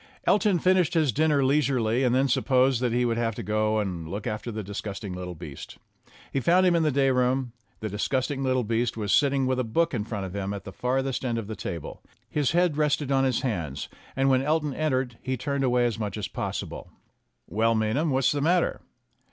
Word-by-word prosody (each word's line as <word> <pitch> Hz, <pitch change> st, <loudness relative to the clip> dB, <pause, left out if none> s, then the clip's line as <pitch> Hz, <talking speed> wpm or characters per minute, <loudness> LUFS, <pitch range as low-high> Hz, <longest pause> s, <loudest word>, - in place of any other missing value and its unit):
Elton 210 Hz, -3 st, +3 dB
finished 180 Hz, -1 st, +2 dB
his 155 Hz, -5 st, +3 dB
dinner 150 Hz, +1 st, +2 dB
leisurely 130 Hz, -4 st, +2 dB
and 125 Hz, -1 st, +3 dB
then 135 Hz, +1 st, +3 dB
supposed 130 Hz, -1 st, +2 dB
that 125 Hz, -2 st, +1 dB
he 120 Hz, +1 st, +1 dB
would 115 Hz, -1 st, 0 dB
have 115 Hz, -2 st, -1 dB
to -, -, -5 dB
go 110 Hz, +1 st, +1 dB
and 90 Hz, -6 st, -3 dB
look 100 Hz, +4 st, -5 dB
after 110 Hz, +2 st, -3 dB
the 110 Hz, -1 st, -4 dB
dis 100 Hz, +1 st, -5 dB
gusting 100 Hz, -2 st, -6 dB
little 90 Hz, -1 st, -6 dB
beast. 75 Hz, -4 st, -9 dB, 0.6 s
He 135 Hz, -, +1 dB
found 175 Hz, +7 st, +4 dB
him 180 Hz, -2 st, +4 dB
in 170 Hz, -, +3 dB
the 155 Hz, -1 st, +2 dB
day 135 Hz, 0 st, +3 dB
room. 125 Hz, 0 st, +1 dB, 0.3 s
The 110 Hz, -, -3 dB
disgusting 130 Hz, +7 st, -1 dB
little 130 Hz, -1 st, +1 dB
beast 115 Hz, +1 st, -1 dB
was 105 Hz, -2 st, 0 dB
sitting 140 Hz, -2 st, +3 dB
with 130 Hz, 0 st, 0 dB
a -, -, +1 dB
book 150 Hz, +9 st, 0 dB
in 110 Hz, -5 st, -1 dB
front 105 Hz, -3 st, -4 dB
of 95 Hz, +1 st, -7 dB
him 100 Hz, 0 st, -3 dB
at 100 Hz, -, -7 dB
the 95 Hz, -, -8 dB
further 130 Hz, +4 st, -1 dB
end 120 Hz, -3 st, -1 dB
of 115 Hz, -, -3 dB
the 110 Hz, +2 st, -6 dB
table. 85 Hz, -3 st, -6 dB, 0.3 s
His 150 Hz, -1 st, 0 dB
head 175 Hz, -3 st, +2 dB
rested 150 Hz, -2 st, +1 dB
on 135 Hz, 0 st, +3 dB
his 130 Hz, -3 st, +1 dB
hands, 85 Hz, -, -3 dB, 0.3 s
and 135 Hz, +1 st, +2 dB
when 130 Hz, -1 st, +4 dB
Elton 150 Hz, 0 st, 0 dB
entered 130 Hz, -6 st, -1 dB
he 130 Hz, 0 st, -2 dB
turned 140 Hz, +2 st, -2 dB
away 125 Hz, -1 st, +3 dB
as 115 Hz, -2 st, -1 dB
much 105 Hz, -1 st, -3 dB
as 105 Hz, -, -3 dB
possible. -, -, -5 dB, 0.6 s
"Well, 115 Hz, +2 st, +1 dB
Maynham, 110 Hz, +9 st, +1 dB
what's 135 Hz, -1 st, +2 dB
the 145 Hz, -, -1 dB
matter?" 175 Hz, +4 st, +1 dB
125 Hz, 220 wpm, -26 LUFS, 110-140 Hz, 0.6 s, found